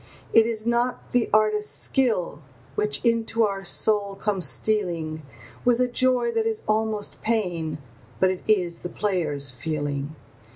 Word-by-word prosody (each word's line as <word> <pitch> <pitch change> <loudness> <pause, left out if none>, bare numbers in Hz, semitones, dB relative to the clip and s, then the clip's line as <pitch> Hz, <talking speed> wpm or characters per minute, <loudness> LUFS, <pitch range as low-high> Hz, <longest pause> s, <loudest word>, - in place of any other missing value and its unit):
It 225 0 +6
is 220 -1 -3
not 240 +1 0
the 245 -2 +2
artist's 215 0 +2
skill 220 - 0 0.3
which 210 +3 0
into 230 -1 +2
our 195 -2 -1
soul 200 +1 +2
comes 195 -2 0
stealing 170 -7 -1 0.4
With 245 -1 +3
a 250 - +3
joy 245 -1 +2
that 225 -1 0
is 220 -1 -2
almost 215 -1 -1
pain, 175 -9 -1 0.4
but 185 0 +4
it 185 - -5
is 180 -6 +1
the 175 - -6
player's 155 -10 -1
feeling. 145 +2 -3
210 Hz, 140 wpm, -24 LUFS, 175-225 Hz, 0.4 s, It